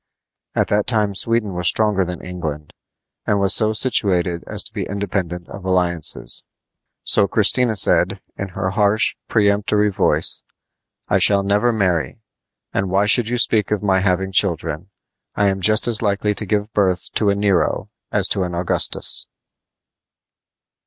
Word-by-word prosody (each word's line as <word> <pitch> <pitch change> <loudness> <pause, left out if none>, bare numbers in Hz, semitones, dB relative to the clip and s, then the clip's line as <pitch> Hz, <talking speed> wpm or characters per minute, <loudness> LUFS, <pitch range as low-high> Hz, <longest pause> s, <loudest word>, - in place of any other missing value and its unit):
At - - 0
that 105 0 0
time 105 -4 0
Sweden 110 0 0
was 90 -1 -1
stronger 105 -2 +2
than 90 -2 -7
England, 80 -5 -6 0.5
and 105 -1 +1
was 100 0 +2
so 110 0 +2
situated 95 -7 0
as - - +2
to - - -5
be - - -4
independent 90 -3 -4
of 100 - -10
alliances. 90 -3 0 0.6
So 100 - +3
Christina 110 +3 +2
said, 95 0 +3 0.2
in 100 - -5
her 95 0 -4
harsh, 105 +2 +1
peremptory 105 0 +1
voice: - - -1 0.7
"I - - +1
shall 100 -1 +3
never 105 +5 +1
marry; 95 -4 -1 0.5
and 95 -1 -1
why 100 +2 +1
should 110 +2 +2
you 125 - -1
speak 110 -3 +2
of 105 -1 -2
my 95 -2 +2
having 95 0 -1
children! 90 -2 -1 0.5
I 100 -1 +2
am 95 0 -3
just 110 +4 +2
as 115 -2 +3
likely 105 -1 0
to 105 0 -4
give 105 +1 -2
birth 95 -3 0
to 105 - +1
a 100 - +1
Nero 100 -3 0 0.2
as - - +3
to 100 - 0
an 90 -1 -3
Augustus." 85 +1 +2
100 Hz, 155 wpm, -19 LUFS, 90-105 Hz, 0.7 s, So